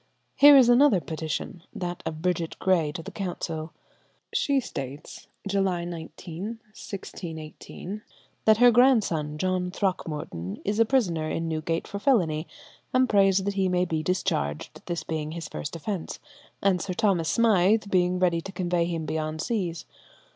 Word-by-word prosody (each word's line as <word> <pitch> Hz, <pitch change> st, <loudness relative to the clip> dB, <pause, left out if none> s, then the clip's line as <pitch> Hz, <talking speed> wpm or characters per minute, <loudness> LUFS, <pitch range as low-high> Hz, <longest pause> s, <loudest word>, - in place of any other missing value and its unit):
Here 285 Hz, 0 st, +9 dB
is 255 Hz, -3 st, +7 dB
another 245 Hz, -4 st, +6 dB
petition; 160 Hz, +1 st, -4 dB
that 175 Hz, -1 st, -4 dB
of 155 Hz, +1 st, -5 dB
Bridget 175 Hz, -2 st, -1 dB
Gray 170 Hz, -5 st, +2 dB
to 165 Hz, -, -6 dB
the -, -, -8 dB
council. 165 Hz, -4 st, -4 dB, 0.6 s
She 280 Hz, -1 st, +2 dB
states 140 Hz, -, -7 dB, 0.2 s
(July 190 Hz, -3 st, 0 dB
19, 170 Hz, 0 st, -7 dB
1618) 200 Hz, -4 st, -8 dB, 0.4 s
that 220 Hz, -1 st, +6 dB
her 245 Hz, +1 st, +7 dB
grandson, 210 Hz, -, +3 dB
John 185 Hz, +1 st, 0 dB
Throckmorton, 155 Hz, -, -3 dB
is 205 Hz, +2 st, 0 dB
a 230 Hz, -, +6 dB
prisoner 180 Hz, -11 st, +1 dB
in 165 Hz, 0 st, -2 dB
Newgate 165 Hz, +1 st, -2 dB
for 200 Hz, -, -5 dB
felony, 170 Hz, -, +2 dB, 0.4 s
and 255 Hz, 0 st, +3 dB
prays 195 Hz, -3 st, +4 dB
that 200 Hz, +1 st, -1 dB
he 190 Hz, -1 st, +1 dB
may 180 Hz, 0 st, +2 dB
be 160 Hz, -3 st, -1 dB
discharged, 75 Hz, -, -2 dB
this 170 Hz, -2 st, -3 dB
being 155 Hz, -1 st, -3 dB
his 165 Hz, -1 st, -5 dB
first 150 Hz, -, -6 dB
offence, 180 Hz, +1 st, -4 dB, 0.4 s
and 190 Hz, -3 st, +3 dB
Sir 190 Hz, -, -3 dB
Thomas 185 Hz, -6 st, +1 dB
Smythe 215 Hz, -2 st, +3 dB
being 180 Hz, -1 st, +2 dB
ready 175 Hz, -2 st, +2 dB
to 195 Hz, -, -8 dB
convey 175 Hz, -2 st, 0 dB
him 165 Hz, -2 st, -3 dB
beyond 155 Hz, 0 st, -3 dB
seas. 175 Hz, -6 st, -2 dB
180 Hz, 150 wpm, -26 LUFS, 160-200 Hz, 0.6 s, Here